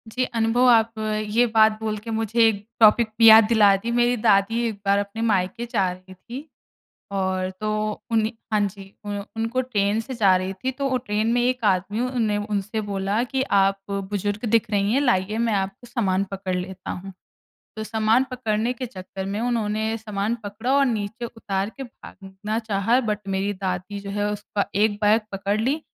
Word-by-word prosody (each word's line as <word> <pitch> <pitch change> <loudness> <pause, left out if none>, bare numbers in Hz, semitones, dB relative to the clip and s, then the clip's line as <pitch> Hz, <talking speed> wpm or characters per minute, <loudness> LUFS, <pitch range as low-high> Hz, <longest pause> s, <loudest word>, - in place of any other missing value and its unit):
जी, 250 +3 -2
अनुभव 230 +1 +1
आप 225 -1 +4 0.4
ये 235 +3 +4
बात 220 -1 +5
बोल 215 -1 -2
के 230 - -6
मुझे 225 +1 -1
एक 205 -2 -1
टॉपिक 225 +1 +6
पे 230 - +2
याद 220 0 +10
दिला 210 -3 +5
दी, 230 +5 -4
मेरी 240 +1 +2
दादी 215 +1 +3
एक 220 - -4
बार 200 0 +3
अपने 205 +2 -4
मायके 210 +1 0
जा 195 -5 +1
रहीं 185 +1 -12
थीं। 240 +9 -9 0.7
और 185 -1 -1
तो 215 - -2 0.4
उन्ह 220 -1 +2 0.2
हाँ 215 - +3
जी, 195 0 -10
उ - - -4 0.3
उनको 225 +3 -1
ट्रेन 210 -5 0
से 245 +3 -7
जा 200 -5 +4
रही 185 +1 -2
थीं, 255 +7 -4
तो 275 +1 -2
ओ 260 - 0
ट्रेन 225 -2 -1
में 240 - +2
एक 250 -1 0
आदमी 200 +2 +1
उन 250 -1 -1
ने 210 -2 +1
उनसे 205 +1 -2
बोला 200 +1 -1
कि, 265 +1 -1
"आप 195 -5 +2
बुज़ुर्ग 200 +2 -3
दिख 230 -1 +2
रही 205 0 +1
हैं, 270 - +3
लाइए 215 -5 +1
मैं 230 -1 +1
आपका 195 +4 -3
सामान 195 -5 0
पकड़ 195 -1 -3
लेता 185 +1 -6
हूँ।" 195 +2 -7 0.6
तो 220 - -4
सामान 220 +3 +2
पकड़ने 230 -1 -1
के 255 +1 -5
चक्कर 190 -4 -8
में, 200 +2 -3
उन्होंने 220 -2 -1
सामान 215 0 -2
पकड़ा 210 +5 -3
और 280 0 +4
नीचे 220 -1 -3
उतार 200 -4 -3
के 270 - -5
भागना 210 -3 -7
चाहा, 220 +2 +1
बट 210 -3 -3
मेरी 195 +1 -1
दादी 185 +1 -4
जो 200 0 -8
है, 205 +1 -1
उसका 205 0 -3
1 210 +2 +3
बैग 215 +2 +4
पकड़ 200 +2 -1
लीं, 270 +7 0
215 Hz, 190 wpm, -23 LUFS, 195-230 Hz, 0.7 s, याद